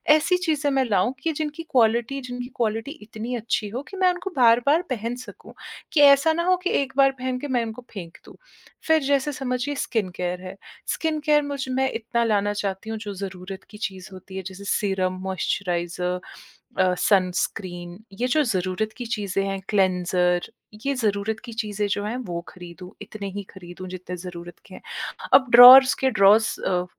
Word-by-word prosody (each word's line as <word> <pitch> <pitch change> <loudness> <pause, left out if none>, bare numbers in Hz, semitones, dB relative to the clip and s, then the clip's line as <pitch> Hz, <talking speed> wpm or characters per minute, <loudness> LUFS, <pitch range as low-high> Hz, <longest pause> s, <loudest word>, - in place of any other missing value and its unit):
ऐसी 360 +4 +2
चीज़ें 305 -3 +1
मैं 270 -1 +2
लाऊँ, 205 +1 +1
कि 325 - +1
जिनकी 305 +1 -4
क्वालिटी 235 +2 +2
जिनकी 245 -1 -6
क्वालिटी 225 +2 -2
इतनी 220 +3 -6
अच्छी 220 -2 -2
हो 245 +6 -4
कि 390 - -9
मैं 370 -1 +4
उनको 355 +2 -6
बार-बार 245 +7 +4
पहन 235 -1 -3
सकूँ, - - -13 0.4
कि 295 - +4
ऐसा 285 +2 +6
ना 340 +1 -1
हो 370 +1 +3
कि 365 - 0
1 265 -1 -5
बार 270 -1 +5
पहन 255 0 -2
के 290 - -5
मैं 235 - +1
उनको 225 +2 -8
फेंक 170 -5 -8
दूँ। - - -14 0.5
फिर 320 -1 +4
जैसे 280 +1 +1
समझिए 265 0 -3
स्किन 220 -8 -1
केयर 180 0 -3
है। 185 +1 -8 0.3
स्किन 315 -1 -1
केयर 300 0 +3
मुझ 280 -2 -4
मैं 265 +1 0
इतना 235 +1 -1
लाना 205 -2 +1
चाहती 200 +1 -4
हूँ, 220 - -3
जो 210 -1 -6
ज़रूरत 190 0 -7
की 210 - -12
चीज़ 190 -3 -6
होती 190 +1 -12
है, - - -3
जैसे 190 +1 -10
सीरम, 190 -2 0
मॉइस्चराइज़र 180 -1 -2 0.6
अ, 185 -1 +3
सनस्क्रीन, 180 -2 0 0.2
ये 240 +6 -2
जो 305 +4 +3
ज़रूरत 195 -1 -1
की 245 - -6
चीज़ें 205 -4 -2
हैं 195 0 -3
क्लेंज़र, 180 -2 +1 0.4
ये 280 - +1
ज़रूरत 215 -3 -1
की 235 - -8
चीज़ें 210 -2 -2
जो 205 0 -1
हैं, 220 +4 -3
वो 180 -9 -5
खरीदूँ। 180 0 -11
इतने 200 -2 -7
ही 205 - -3
खरीदूँ, 180 0 -10
जितने 180 0 -7
ज़रूरत 175 -1 -9
के - - -13
हैं। - - -10 0.5
अब 260 - +7
ड्रावर्स 255 +2 +10
के 265 - +3
ड्रावर्स 210 0 +4
अ, 180 -1 0
220 Hz, 185 wpm, -24 LUFS, 185-260 Hz, 0.6 s, ड्रावर्स